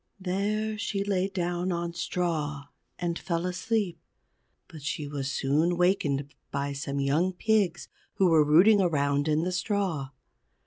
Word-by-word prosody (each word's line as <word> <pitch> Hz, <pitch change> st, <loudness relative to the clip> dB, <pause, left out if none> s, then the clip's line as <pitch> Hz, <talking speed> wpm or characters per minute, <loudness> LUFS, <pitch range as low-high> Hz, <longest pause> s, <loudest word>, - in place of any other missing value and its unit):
There 210 Hz, +3 st, -1 dB
she 200 Hz, -2 st, -1 dB
lay 195 Hz, -2 st, 0 dB
down 175 Hz, -1 st, -2 dB
on 170 Hz, 0 st, -2 dB
straw 155 Hz, -5 st, -2 dB, 0.3 s
and 175 Hz, -1 st, -2 dB
fell 170 Hz, -2 st, -2 dB
asleep; 185 Hz, +1 st, -1 dB, 0.7 s
but 155 Hz, -, -11 dB
she 145 Hz, +1 st, -3 dB
was 140 Hz, -1 st, -3 dB
soon 155 Hz, +7 st, +1 dB
wakened 145 Hz, -6 st, +1 dB, 0.2 s
by 140 Hz, 0 st, -2 dB
some 140 Hz, 0 st, -3 dB
young 155 Hz, +7 st, +1 dB
pigs 195 Hz, -3 st, +1 dB, 0.3 s
who 190 Hz, -, +4 dB
were 160 Hz, -3 st, +5 dB
rooting 185 Hz, +8 st, +6 dB
around 145 Hz, -4 st, +1 dB
in 155 Hz, +1 st, +2 dB
the 180 Hz, -, -1 dB
straw. 180 Hz, -8 st, -1 dB
175 Hz, 140 wpm, -28 LUFS, 145-190 Hz, 0.7 s, rooting